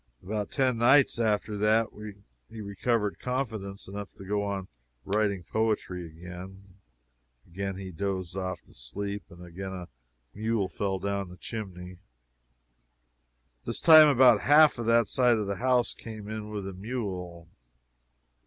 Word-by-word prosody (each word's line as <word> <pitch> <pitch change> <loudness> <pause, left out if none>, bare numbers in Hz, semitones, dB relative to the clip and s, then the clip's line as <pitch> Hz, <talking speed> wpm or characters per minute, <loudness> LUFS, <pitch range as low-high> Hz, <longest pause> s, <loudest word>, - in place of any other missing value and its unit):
About 105 +1 -3
ten 130 -4 +1
nights 130 +1 +5
after 105 -1 0
that, 110 +2 +4 0.6
he 115 - -10
recovered 105 +1 -1
confidence 110 -7 -4
enough 100 +1 -7
to 95 - -11
go 100 0 -1
to 95 - -14 0.4
writing 100 -2 0
poetry 100 -4 -1
again. 90 +4 -11 0.7
Again 95 +2 -4
he 95 -1 -7
dozed 95 0 -3
off 95 -2 -4
to - - -22
sleep, 100 +11 -5
and 85 +1 -12
again 95 +2 -7
a 90 -2 -7 0.5
mule 110 -2 -1
fell 95 -1 -2
down 100 0 -3
the 90 - -12
chimney. 90 -5 -7 1.6
This - - -3
time, 155 -2 +9
about 125 -6 +6
half 150 -2 +6
of 115 - -3
that 115 -1 +4
side 125 -3 +3
of 105 - -1
the 100 0 -3
house 125 -1 +2
came 110 -2 -9
in 110 0 -5
with 105 -2 -4
the 95 - -5
mule. 90 -5 -5
100 Hz, 145 wpm, -28 LUFS, 95-115 Hz, 1.6 s, time